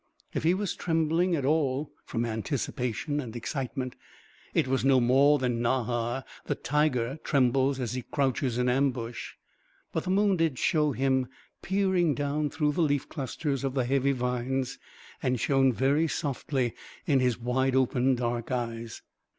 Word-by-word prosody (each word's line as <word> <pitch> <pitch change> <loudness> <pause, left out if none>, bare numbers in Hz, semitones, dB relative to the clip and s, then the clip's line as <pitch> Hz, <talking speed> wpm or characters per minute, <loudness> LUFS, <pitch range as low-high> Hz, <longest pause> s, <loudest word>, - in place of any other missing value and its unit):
If - - -1
he 170 +3 +3
was 200 -2 -2
trembling 165 +2 +1
at 140 -4 -1
all, 145 -1 +1
from 115 0 -2
anticipation 125 +4 -2
and 120 -5 -6
excitement, 130 +1 -4 0.6
it - - +1
was 130 0 0
no 135 -1 +5
more 135 +4 +5
than 125 -3 -1
Nahar 120 +1 0 0.2
the - - 0
tiger 140 -2 0
trembles 135 0 +2
as 120 -3 -2
he 125 - -2
crouches 130 -1 -1
in 125 0 +1
ambush. 125 -2 -1 0.6
But - - -2
the - - -3
moon 195 0 +3
did 165 -5 +1
show 150 +1 +2
him 130 0 +1 0.3
peering 190 -5 +2
down 145 +1 -1
through 150 0 0
the 160 - -1
leaf 145 -4 +1
clusters 140 0 -3
of 135 -1 -2
the 130 -3 +1
heavy 135 +2 +2
vines 125 0 -2 0.4
and 125 -1 0
shone 135 +1 +3
very 140 +6 +2
softly 135 -5 -1 0.3
in 140 -4 +3
his 125 -3 +2
wide 130 +2 +1
open 130 0 +3
dark 120 -1 -2
eyes. 115 -2 -4
135 Hz, 155 wpm, -28 LUFS, 125-150 Hz, 0.6 s, no